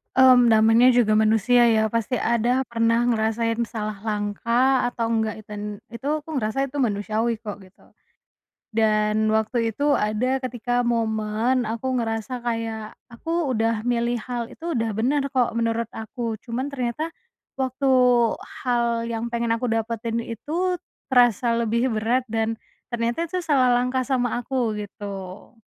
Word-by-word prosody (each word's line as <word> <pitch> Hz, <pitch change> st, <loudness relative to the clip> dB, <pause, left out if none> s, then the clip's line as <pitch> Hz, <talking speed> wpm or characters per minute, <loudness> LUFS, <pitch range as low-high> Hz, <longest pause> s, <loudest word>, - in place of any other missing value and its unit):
Mmm, 255 Hz, -1 st, +7 dB
namanya 225 Hz, +2 st, +5 dB
juga 215 Hz, -3 st, +3 dB
manusia 225 Hz, +3 st, +4 dB
ya 220 Hz, -2 st, +3 dB
pasti 230 Hz, +3 st, -2 dB
ada 235 Hz, +3 st, +2 dB
pernah 230 Hz, 0 st, +2 dB
ngerasain 225 Hz, 0 st, 0 dB
salah 215 Hz, -2 st, -5 dB
langkah 235 Hz, +5 st, +1 dB
atau 235 Hz, -2 st, -2 dB
enggak 220 Hz, -1 st, -1 dB
iten 210 Hz, -1 st, -7 dB
itu 235 Hz, +3 st, -10 dB, 0.2 s
aku 310 Hz, -, -16 dB
ngerasa 255 Hz, +4 st, -1 dB
itu 290 Hz, -, -7 dB
manusiawi 220 Hz, -1 st, 0 dB
kok 210 Hz, -3 st, -6 dB
gitu. 185 Hz, -, -23 dB, 0.9 s
Dan 215 Hz, -1 st, +2 dB
waktu 225 Hz, 0 st, 0 dB
itu 285 Hz, 0 st, +2 dB
ada 225 Hz, +5 st, 0 dB
ketika 245 Hz, -1 st, -2 dB
momen 225 Hz, +1 st, 0 dB
aku 250 Hz, +3 st, -2 dB
ngerasa 225 Hz, +2 st, -3 dB
kayak 225 Hz, -2 st, -3 dB, 0.2 s
aku 325 Hz, +5 st, -2 dB
udah 225 Hz, -2 st, 0 dB
milih 240 Hz, 0 st, 0 dB
hal 240 Hz, -2 st, -3 dB
itu 330 Hz, +2 st, -4 dB
udah 225 Hz, -2 st, -1 dB
bener 270 Hz, +6 st, +1 dB
kok 245 Hz, -2 st, +3 dB
menurut 230 Hz, 0 st, -1 dB
aku 225 Hz, 0 st, -5 dB
cuman 255 Hz, +4 st, -3 dB
ternyata, 260 Hz, +4 st, -3 dB, 0.5 s
waktu 265 Hz, +1 st, 0 dB, 0.7 s
hal 240 Hz, -2 st, +1 dB, 0.2 s
yang 230 Hz, 0 st, -2 dB
pengen 235 Hz, 0 st, -1 dB
aku 250 Hz, -, -2 dB
dapetin 230 Hz, +1 st, -2 dB
itu 330 Hz, -, -2 dB, 0.3 s
terasa 245 Hz, -2 st, +4 dB
lebih 235 Hz, +1 st, +1 dB
berat 235 Hz, +4 st, +1 dB
dan, 225 Hz, 0 st, 0 dB, 0.4 s
ternyata 235 Hz, +2 st, -1 dB
itu 365 Hz, +3 st, -3 dB
salah 270 Hz, -6 st, +3 dB
langkah 250 Hz, +1 st, +1 dB
sama 245 Hz, -3 st, 0 dB
aku 245 Hz, -3 st, -1 dB
gitu. 195 Hz, 0 st, -9 dB
230 Hz, 140 wpm, -23 LUFS, 220-250 Hz, 0.9 s, Mmm